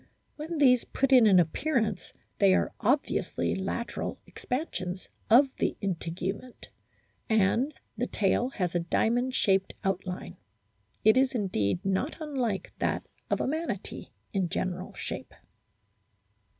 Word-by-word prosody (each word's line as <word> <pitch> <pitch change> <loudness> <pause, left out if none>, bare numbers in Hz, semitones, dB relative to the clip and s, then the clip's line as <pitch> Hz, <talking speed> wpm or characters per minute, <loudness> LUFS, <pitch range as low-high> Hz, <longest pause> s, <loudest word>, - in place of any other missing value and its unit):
When 315 +2 -5
these 250 -4 +5
put 270 0 -1
in 245 -4 +8
an 190 -3 +7
appearance 215 - 0 0.3
they 195 -2 +6
are - - 0
obviously 260 +7 0
lateral 195 +5 -3
ex - - -13
pansions 190 - -3 0.2
of 260 +5 +7
the - - 0
integument, 190 +5 -4 0.6
and 220 +6 +3 0.2
the 245 - -1
tail 220 +5 +1
has 180 -9 -2
a 175 - +2
diamond 240 +9 +1
shaped 195 -1 +2
outline; 180 - -3 0.7
it 220 +3 +6
is 265 0 +3
indeed 180 - 0
not 195 +10 0
unlike 260 -10 -2
that - - 0 0.2
of - - +1
a - - 0
Manatee 315 +4 -3 0.3
in 190 -4 0
general 185 +1 -3
shape. - - -6
215 Hz, 125 wpm, -29 LUFS, 185-255 Hz, 0.7 s, in